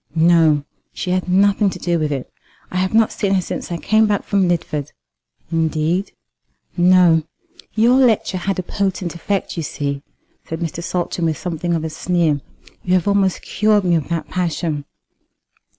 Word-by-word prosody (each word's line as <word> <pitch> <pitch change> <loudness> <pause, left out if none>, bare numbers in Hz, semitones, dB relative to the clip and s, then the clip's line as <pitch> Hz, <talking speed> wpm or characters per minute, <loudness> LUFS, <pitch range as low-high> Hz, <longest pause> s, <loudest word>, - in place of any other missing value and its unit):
"No; 160 -3 +4 0.3
she 180 - -3
had 185 0 -1
nothing 200 +2 +3
to - - -6
do 170 -1 0
with 155 -1 -1
it. 135 -3 -4 0.4
I 185 - -3
have 185 +3 0
not 225 -1 +4
seen 195 -2 0
her 185 - +2
since 175 - -5
I 170 - -1
came 215 +5 +3
back 205 -1 0
from 195 -2 +1
Lidford." 150 -4 -2 0.6
"Indeed!" 165 +3 0 0.6
"No. 175 -2 +5 0.5
Your 235 +3 +4
lecture 225 -7 +2
had 195 +1 -2
a 185 - -2
potent 190 -2 -2
effect, 190 +2 -3
you - - -1
see," 140 -2 -3 0.5
said 160 - -4
Mr. 170 -1 -4
Saltram, 175 -1 -2
with 155 -2 -1
something 170 0 -2
of 160 - -2
a 160 - -2
sneer. 165 -5 0 0.4
"You 185 0 +2
have 180 0 +1
almost 200 -2 +1
cured 210 0 +2
me 180 -2 +2
of 160 -3 0
that 165 -3 -2
passion." 165 -4 -2
175 Hz, 170 wpm, -19 LUFS, 160-195 Hz, 0.6 s, No